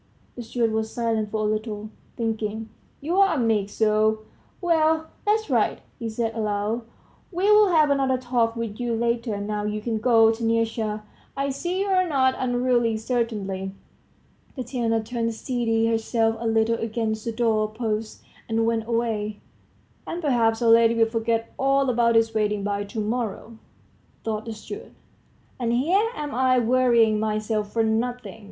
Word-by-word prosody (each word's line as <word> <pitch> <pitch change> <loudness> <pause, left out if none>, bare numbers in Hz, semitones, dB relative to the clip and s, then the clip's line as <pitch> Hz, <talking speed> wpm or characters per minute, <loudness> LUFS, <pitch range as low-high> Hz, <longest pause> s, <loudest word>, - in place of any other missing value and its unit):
The 245 - -6
steward 230 0 -1
was 220 0 -2
silent 225 -3 -1
for 215 +1 -2
a 210 0 +1
little, 215 -1 -4 0.3
thinking, 220 -1 -3 0.3
"You're 365 +7 +3
a 350 - 0
meek 220 -5 +1
soul! 215 0 +1 0.4
Well, 320 -2 +2 0.2
that's 435 +1 +2
right," - - +1 0.2
he 230 -2 -3
said 225 0 -2
aloud; 215 +1 -1 0.5
"we'll 415 +4 +5
have 310 -5 +4
another 270 -2 +2
talk 245 -2 0
with 230 -2 -5
you 240 -1 -1
later, 235 -2 -1
now 210 +1 -3
you 210 0 -2
can 220 0 -2
go, 225 -1 +5
Taniusha; 225 -1 -1 0.3
I 275 0 0
see 350 +7 -2
you're 375 -2 +2
not 260 -3 +3
unruly, 245 -2 +1
certainly." 210 -5 -2 0.8
Tatiana 235 -3 -1
turned, 230 0 -2
steadied 225 -2 0
herself 225 0 +1
a 230 - -2
little 225 +1 +2
against 220 -1 -2
the 230 - -1
doorpost, 220 -1 -1 0.3
and 225 0 +1
went 225 -1 0
away. 220 -3 -1 0.7
"And, 340 - -4
perhaps, 240 -7 +1
our 230 - +4
lady 230 0 +5
will 225 0 +4
forget 225 0 -1
all 275 0 +2
about 235 -1 +2
this 225 0 +3
wedding 210 -2 0
by 205 0 -2
to 210 +3 -6
morrow," 225 0 -3 0.6
thought 220 -1 -3
the 225 - -5
steward; 410 - -9 0.7
"and 235 -2 0
here 360 - +2
am 295 -1 -5
I 255 0 +3
worrying 235 -3 +3
myself 215 -1 -1
for 230 - +1
nothing! 225 -1 -2
230 Hz, 150 wpm, -24 LUFS, 220-245 Hz, 0.8 s, we'll